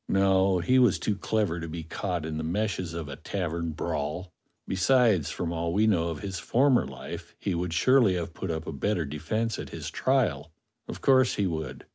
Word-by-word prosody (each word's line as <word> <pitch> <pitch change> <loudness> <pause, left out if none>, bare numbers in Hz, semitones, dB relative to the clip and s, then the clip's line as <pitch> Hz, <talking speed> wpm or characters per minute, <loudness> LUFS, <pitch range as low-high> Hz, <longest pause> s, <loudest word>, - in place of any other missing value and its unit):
No, 95 -1 +3
he 125 +10 +3
was 125 -6 +4
too 105 - -1
clever 100 -4 -1
to 85 - -5
be 80 +1 -6
caught 85 0 -3
in 80 -1 -3
the - - -3
meshes 90 -1 -2
of 85 -3 -4
a 70 - -7
tavern 85 -2 -3
brawl. 75 +5 -3 0.3
Besides, 105 - +3
from 85 -1 -3
all 85 0 -2
we 105 +3 +3
know 90 -6 +2
of 80 -3 -4
his 95 -2 -4
former 130 0 +3
life, - - -8
he 95 - -2
would 85 0 -2
surely 110 +2 +4
have 85 -1 -4
put 95 - -5
up 80 0 -3
a 80 - -5
better 85 +4 0
defence 80 +11 -2
at - - -6
his - - -6
trial; 80 - 0 0.4
of - - -7
course 130 -2 +4
he 100 - +1
would. 80 -6 -4
90 Hz, 200 wpm, -27 LUFS, 80-105 Hz, 0.4 s, was